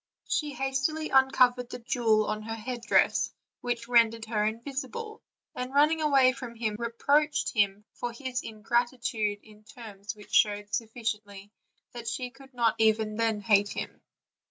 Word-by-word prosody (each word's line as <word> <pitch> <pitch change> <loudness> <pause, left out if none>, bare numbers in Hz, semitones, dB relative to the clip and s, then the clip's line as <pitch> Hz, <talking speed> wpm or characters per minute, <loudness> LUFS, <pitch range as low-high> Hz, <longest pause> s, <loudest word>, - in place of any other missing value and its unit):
She 295 -2 -1
hastily 270 +4 -1
uncovered 255 -2 +4
the 245 - -6
jewel 230 -3 +1
of 215 +1 -2
her 225 +1 -4
headdress 240 +1 +1 0.3
which 240 -1 -3
rendered 230 -2 +3
her 215 -2 0
invisible, 280 - -4 0.3
and 250 +1 -5
running 305 +3 +4
away 275 -4 +5
from 255 -3 -8
him, 225 -2 -2
reproached 285 +6 +1
him 205 -2 +1
for 245 -1 -4
his 255 +1 -4
in 215 -1 -10
gratitude 235 -3 0
in 215 -1 -18
terms 215 -2 -9
which 210 -1 -15
showed 205 -1 +2
sufficiently 215 -3 -4 0.4
that 235 -1 -8
she 250 +2 -3
could 270 0 -16
not 235 -2 +3
even 220 -1 +2
then 225 -2 0
hate 205 -1 +3
him. - - -6
235 Hz, 150 wpm, -28 LUFS, 215-255 Hz, 0.4 s, away